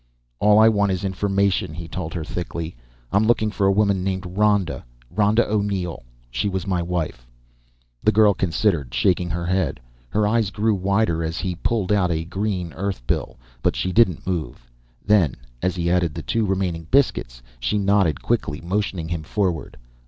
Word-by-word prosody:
"All 105 0 +5
I 110 +1 +7
want 100 -3 +3
is 95 0 -2
information," 95 -3 0
he 85 0 -7
told 85 -1 -5
her 85 - -2
thickly. 85 -1 -5 0.4
"I'm 100 +2 +3
looking 110 -2 +2
for 100 -1 +1
a - - +5
woman 100 -2 +2
named 95 0 -2
Ronda 100 0 +1 0.3
Ronda 105 +2 +3
O'Neill. 100 -7 -1 0.3
She 100 - 0
was 95 -1 -3
my 90 -3 0
wife." 85 -8 -3 0.8
The 110 - +5
girl 105 -1 +5
considered, 85 - 0
shaking 90 +1 +2
her 85 -1 -2
head. 95 +1 0 0.3
Her 105 - +1
eyes 110 -2 +2
grew 105 +2 +1
wider 95 -3 +1
as 80 +1 -3
he 95 -2 -2
pulled 105 +2 -1
out 100 -3 +3
a 80 -1 -1
green 95 -2 -3
Earth 95 -7 -4
bill, - - -2 0.2
but - - +1
she 95 - -1
didn't 95 -5 +3
move. 80 -10 -4 0.4
Then, 100 -10 +3 0.3
as 95 - 0
he 85 -1 0
added 85 -4 +1
the 80 - -5
two 115 -2 0
remaining 90 -4 -1
biscuits, - - +1 0.2
she - - 0
nodded 100 -7 +2
quickly, 75 +1 -1
motioning 95 -2 -2
him 85 -2 -2
forward. 85 -5 -2
95 Hz, 175 wpm, -22 LUFS, 85-105 Hz, 0.8 s, I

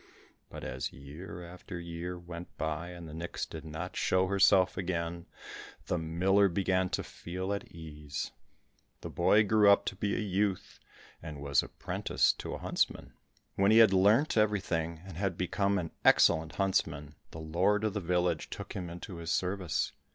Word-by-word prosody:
But - - -9
as 65 0 -4
year 75 +7 -9
after 90 0 -8
year 85 +1 -5
went 85 0 -9
by 80 +2 -3
and 85 -2 -9
the 75 - -9
nix 85 +2 -4
did - - -9
not 80 0 -6
show 95 0 +2
herself 95 -1 +4
again, 85 -2 -3 0.6
the 90 - -1
miller 95 +5 +3
began 95 0 +1
to - - -2
feel 95 +3 -5
at 100 - -4
ease. 75 -4 -6 0.7
The - - -6
boy 110 +1 +4
grew 105 0 +5
up 100 - +5
to - - -3
be 100 +1 -1
a - - -1
youth 100 -2 -1 0.4
and 75 -3 -7
was 70 -1 +2
apprenticed - - 0
to - - -4
a - - -5
huntsman. - - -1 0.4
When 100 +1 +3
he 110 - +6
had 110 -4 +7
learnt 105 +10 +4
everything, 85 -6 0
and 95 -4 -9
had 95 -2 -1
become 100 +2 +1
an 85 -4 -3
excellent 80 0 +4
huntsman, 75 -7 0 0.2
the - - -10
lord 90 +7 +1
of 110 -2 0
the 105 - -1
village 90 0 0
took - - -7
him 90 -3 -5
into 85 +1 -8
his 85 0 -6
service. 90 -2 0
90 Hz, 170 wpm, -31 LUFS, 85-100 Hz, 0.7 s, had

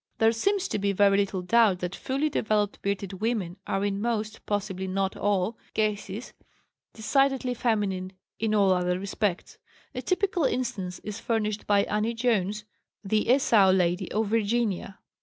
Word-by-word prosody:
There 225 0 +4
seems 390 - 0
to - - -1
be 200 0 0
very 200 0 +4
little 195 -2 0
doubt 220 -1 +4
that 180 +1 -3
fully 275 +4 -1
developed 215 -7 0
"bearded 200 -1 -2
women" 210 -6 -1
are 195 +1 0
in 200 0 -1
most, 220 -2 -2
possibly 195 -2 -2
not 190 0 -1
all, 205 +1 0 0.2
cases 210 +1 -2 0.6
decidedly 265 +2 +1
feminine 200 -6 -1 0.3
in 215 -1 +1
all 200 -2 +4
other 180 0 +1
respects. 200 -1 -3 0.3
A - - -4
typical 365 -4 0
instance 235 -9 -2
is 210 +1 -6
furnished 215 -3 -2
by 200 -1 +4
Annie 215 +3 -1
Jones, 210 -3 0 0.4
the 215 +2 0
"Esau 230 -7 +5
Lady" 180 0 +1
of 220 +1 +1
Virginia. 215 -3 0
210 Hz, 150 wpm, -27 LUFS, 195-230 Hz, 0.6 s, Esau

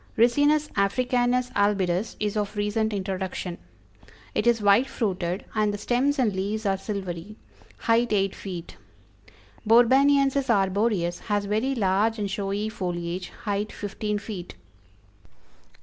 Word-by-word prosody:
Ricinus 290 +6 +4
Africanus 245 +4 +1
albidus 200 -1 +1
is 210 -1 -1
of 210 0 -2
recent 210 +1 0
introduction. 190 -2 -4 0.7
It - - 0
is 235 -1 +4
white 205 +5 +4
fruited, 185 -7 -2
and 215 -1 +1
the 205 - -4
stems 260 +7 +1
and 225 -7 +1
leaves 210 +3 -2
are 195 -1 +2
silvery; 195 -1 -5 0.4
height 235 +1 +2
eight 195 -2 +1
feet. 180 -4 -8 0.9
Borbaniensis 270 +4 +4
arboreus 195 -3 +1
has 205 -1 +1
very 220 +7 0
large 210 +1 +1
and 205 -2 -2
showy 200 +1 -2
foliage; 180 -4 -4
height 205 0 -2
fifteen 210 +1 -3
feet. 200 -4 -7
210 Hz, 120 wpm, -25 LUFS, 195-235 Hz, 0.9 s, Ricinus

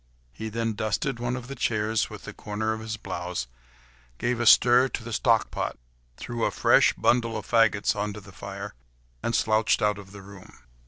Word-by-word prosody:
He 110 0 -6
then 115 0 -2
dusted 115 +4 -2
one 120 +1 -1
of 125 -1 -7
the 135 - -6
chairs 110 -3 0
with - - -10
the - - -8
corner 110 +1 -3
of 110 - -5
his 110 0 -5
blouse, 90 - -4 0.7
gave 120 - -1
a 120 - +1
stir 125 +3 +7
to 120 - -5
the 115 0 -6
stock - - +2
pot, - - -3 0.4
threw 120 -1 -4
a - - +3
fresh - - +4
bundle 115 -2 +1
of - - -6
faggots 115 -3 +3
on 105 0 -2
to 105 - -8
the 100 -1 -14
fire, 100 +1 -7 0.5
and 115 - -1
slouched 110 0 +2
out 105 -1 +1
of 95 -1 -12
the 100 -1 -11
room. 100 -1 -14
110 Hz, 200 wpm, -26 LUFS, 100-115 Hz, 0.7 s, stir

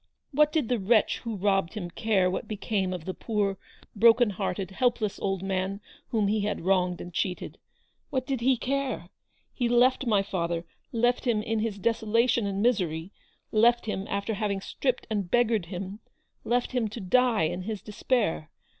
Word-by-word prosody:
What 300 +1 +4
did 300 -6 +1
the 245 -1 +1
wretch 215 +3 +3
who 230 -2 -4
robbed 195 -1 +1
him 175 -5 -5
care 200 -2 +2
what 185 - -2
became 205 -3 -1
of 180 -3 -5
the 185 - -3
poor, 200 -3 -1 0.4
broken 230 +1 +5
hearted, 190 -1 -3
helpless 235 -2 0
old 195 -2 -1
man 190 +1 -1 0.3
whom 220 -5 +1
he 215 +2 +1
had 210 +1 -2
wronged 180 0 +1
and 175 - -8
cheated? 180 0 -3 0.5
What 260 -2 -1
did 265 -2 -2
he 255 +1 +3
care? 260 -8 -2 0.4
He 245 -2 0
left 250 +2 +3
my 205 -3 +3
father; 170 -3 -2 0.3
left 240 +2 +1
him 220 -4 +1
in 225 0 -1
his 215 -2 -2
desolation 230 +1 +2
and 200 +1 -1
misery; 180 -7 0 0.4
left 235 +2 +4
him 200 -2 -3
after 200 +3 -1
having 205 -1 -1
stripped 250 +5 -2
and 200 -4 -1
beggared 230 -6 +2
him; 190 +3 -6 0.4
left 245 +1 0
him 245 -4 0
to 215 +3 -7
die 230 0 +3
in 175 +3 -1
his 210 +1 -5
despair. 210 - -1
210 Hz, 170 wpm, -27 LUFS, 190-235 Hz, 0.5 s, broken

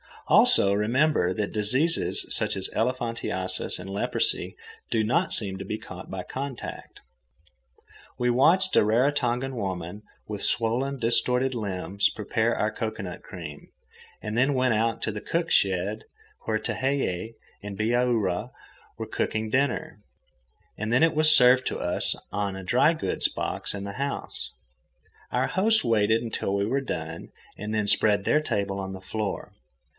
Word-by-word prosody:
Also, 100 - +6
remember 110 - +2
that 105 +1 -3
diseases 130 +10 +2
such - - +4
as 95 -1 -1
elephantiasis 115 -6 -1
and 90 +2 -8
leprosy 100 +1 +1 0.3
do 110 -1 +1
not 165 +12 +1
seem 95 -3 0
to 95 - -7
be 110 - -3
caught 95 -3 -10
by 95 -1 -5
contact. 135 +2 -7 1.2
We 125 0 +1
watched 175 +10 +3
a - - +6
Raratongan 125 +2 +1
woman, 95 -3 -5 0.2
with 105 -2 -5
swollen, 125 +5 +1
distorted 125 +2 +2
limbs, 100 -3 -1
prepare 110 +2 -1
our 110 - 0
cocoanut 110 -5 -5
cream, 80 -6 -9 0.6
and 110 +1 -3
then 135 +3 +3
went 130 -2 +2
out 115 +1 0
to 110 - -1
the 105 0 -6
cook 170 0 -2
shed 100 +3 +1 0.4
where 110 -1 0
Tehei 115 -5 -2 0.3
and 100 -1 -7
Bihaura 115 -2 0 0.5
were - - -4
cooking 110 0 -2
dinner. 130 -3 -1 0.8
And 110 +2 -2
then 130 - +4
it 165 - +4
was 155 0 +6
served 125 +1 +5
to - - -3
us - - 0 0.2
on 100 -1 -2
a 95 - -7
dry 125 - +3
goods 160 - -1
box - - -4
in 100 - -5
the 100 0 -6
house. 140 +4 -4 0.8
Our - - 0
hosts 220 +3 +4
waited 110 0 +2
until 110 -3 -2
we 100 0 0
were 135 +6 0
done 80 -10 -6 0.3
and 105 +1 -4
then 105 -1 0
spread 100 0 +3
their 150 +9 +2
table 100 -7 -2
on 95 0 -5
the 95 - -9
floor. 105 +2 -4
110 Hz, 150 wpm, -26 LUFS, 100-130 Hz, 1.2 s, Also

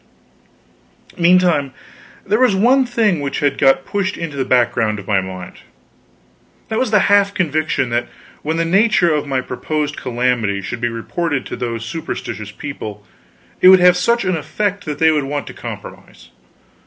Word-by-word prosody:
Meantime 175 -5 +3 0.5
there 210 +3 +1
was 255 -6 +4
one 250 +6 +3
thing 220 - +1
which 140 -1 -3
had 145 -2 +1
got 135 -1 +3
pushed 200 0 -2
into 165 -4 -5
the 135 - -1
background 120 -4 +1
of 100 - -9
my 100 -3 +2
mind. 95 -1 -8 1.1
That 220 0 -1
was 255 - 0
the 210 -2 +4
half 200 0 +3
conviction 155 -7 0
that 120 +1 -1 0.3
when 160 +2 -2
the 165 - +1
nature 190 -1 +3
of 150 -1 -1
my 135 -2 0
proposed 150 +4 -3
calamity 120 -5 -1
should 120 +5 -5
be 120 - 0
reported 135 +5 -3
to - - -6
those 115 -2 -4
superstitious 135 -9 -5
people, 105 -5 -8 0.6
it - - +7
would 190 0 +8
have 180 0 +6
such 235 +4 +1
an 185 -1 +1
effect 200 +6 -3
that 150 -2 -4
they 160 +1 +4
would 150 -3 0
want 140 -2 -3
to - - -9
compromise. - - -10
150 Hz, 165 wpm, -18 LUFS, 125-185 Hz, 1.1 s, would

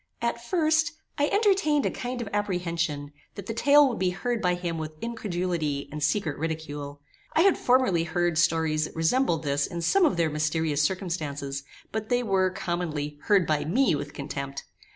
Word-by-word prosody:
At 235 0 -2
first, 315 +1 +2 0.3
I 290 - +3
entertained 390 -9 +2
a - - +1
kind 245 0 -4
of 210 - -7
apprehension, 170 -7 -1 0.2
that 200 - -7
the 225 - -3
tale 285 +4 +6
would 240 - -3
be 185 -1 +2
heard 230 +6 -2
by 180 -3 +2
him 170 -2 -3
with 155 0 -5
incredulity 175 -10 -2
and 150 +1 -5
secret 150 0 0
ridicule. 145 -3 -4 0.3
I 320 - +5
had 390 +1 +5
formerly 245 -10 +2
heard 175 -2 0
stories 160 -2 +2
that - - -10
resembled 165 0 +1
this 140 -1 0
in 170 -2 -5
some 385 - +4
of 240 - +1
their 165 -2 +2
mysterious 155 0 0
circumstances, 150 -6 -2 0.3
but 220 0 -4
they 245 0 +2
were, 190 -4 +2
commonly, 160 -5 -3
heard 200 -5 +4
by 155 -2 +1
me 245 - +2
with 145 0 -3
contempt. 140 -1 -5
175 Hz, 175 wpm, -27 LUFS, 155-235 Hz, 0.3 s, tale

